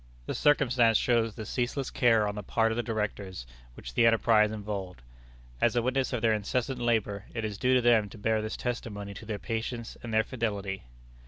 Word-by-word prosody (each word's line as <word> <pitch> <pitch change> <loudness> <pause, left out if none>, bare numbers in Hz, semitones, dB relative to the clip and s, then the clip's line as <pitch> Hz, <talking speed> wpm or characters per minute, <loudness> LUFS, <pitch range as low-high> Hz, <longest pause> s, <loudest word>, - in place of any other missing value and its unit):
The - - -3
circumstance 125 -6 +4
shows 115 -3 +1
the 110 - -6
ceaseless 125 +4 -2
care 115 -4 +3
on 105 - -2
the 105 - -5
part 115 +3 +1
of - - -1
the 120 - 0
directors 105 - -4 0.3
which - - -9
the 115 - +5
enterprise 110 -1 +4
involved. 100 - -5 0.6
As - - +3
a 120 - +2
witness 130 +1 0
of 120 -3 -2
their 115 -1 +4
incessant 125 +5 -1
labor, 110 -4 0
it 110 -2 -2
is 105 -2 -5
due 130 +1 +3
to 125 - +4
them 115 -4 +4
to - - -12
bear 110 +1 +1
this 110 0 -4
testimony 105 -5 -4
to 105 +2 -10
their 110 -2 -2
patience 115 +2 -4
and 120 - -6
their 110 0 +3
fidelity. 100 - -3
110 Hz, 200 wpm, -29 LUFS, 105-120 Hz, 0.6 s, the